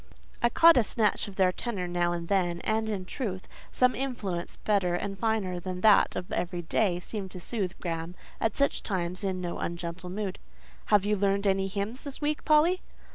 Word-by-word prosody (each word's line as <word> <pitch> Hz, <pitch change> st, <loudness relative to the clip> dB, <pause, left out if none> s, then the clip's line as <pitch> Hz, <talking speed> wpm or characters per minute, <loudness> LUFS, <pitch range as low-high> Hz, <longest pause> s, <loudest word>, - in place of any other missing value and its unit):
I 235 Hz, -, +4 dB
caught 330 Hz, +4 st, +7 dB
a 245 Hz, -, +5 dB
snatch 210 Hz, -1 st, +1 dB
of 200 Hz, -, -9 dB
their 185 Hz, -1 st, +4 dB
tenor 190 Hz, -2 st, -4 dB
now 175 Hz, 0 st, 0 dB
and 170 Hz, -1 st, -3 dB
then; 175 Hz, -3 st, +1 dB
and, 220 Hz, 0 st, 0 dB
in 195 Hz, -4 st, -3 dB
truth, 190 Hz, -3 st, -4 dB, 0.2 s
some 250 Hz, 0 st, +3 dB
influence 210 Hz, -10 st, -4 dB
better 195 Hz, -4 st, +1 dB
and 195 Hz, +2 st, -3 dB
finer 205 Hz, -5 st, 0 dB
than 180 Hz, 0 st, -5 dB
that 215 Hz, -1 st, +5 dB
of 180 Hz, -, -5 dB
every 175 Hz, 0 st, -2 dB
day, 175 Hz, +1 st, +1 dB
seemed 195 Hz, +1 st, -4 dB
to 180 Hz, -, -8 dB
soothe 190 Hz, -1 st, -2 dB
Graham 165 Hz, 0 st, -4 dB, 0.2 s
at 225 Hz, -2 st, 0 dB
such 280 Hz, 0 st, +2 dB
times 185 Hz, -1 st, -1 dB
into 185 Hz, -2 st, -2 dB
no 170 Hz, -, -4 dB
ungentle 170 Hz, +1 st, -4 dB
mood. 195 Hz, 0 st, -4 dB, 0.5 s
"Have 205 Hz, -2 st, +3 dB
you 210 Hz, +1 st, +2 dB
learned 200 Hz, 0 st, +1 dB
any 195 Hz, -1 st, +2 dB
hymns 205 Hz, +6 st, -3 dB
this 280 Hz, -3 st, -6 dB
week, 300 Hz, 0 st, -1 dB
Polly?" 315 Hz, +4 st, +4 dB
195 Hz, 190 wpm, -28 LUFS, 180-220 Hz, 0.5 s, caught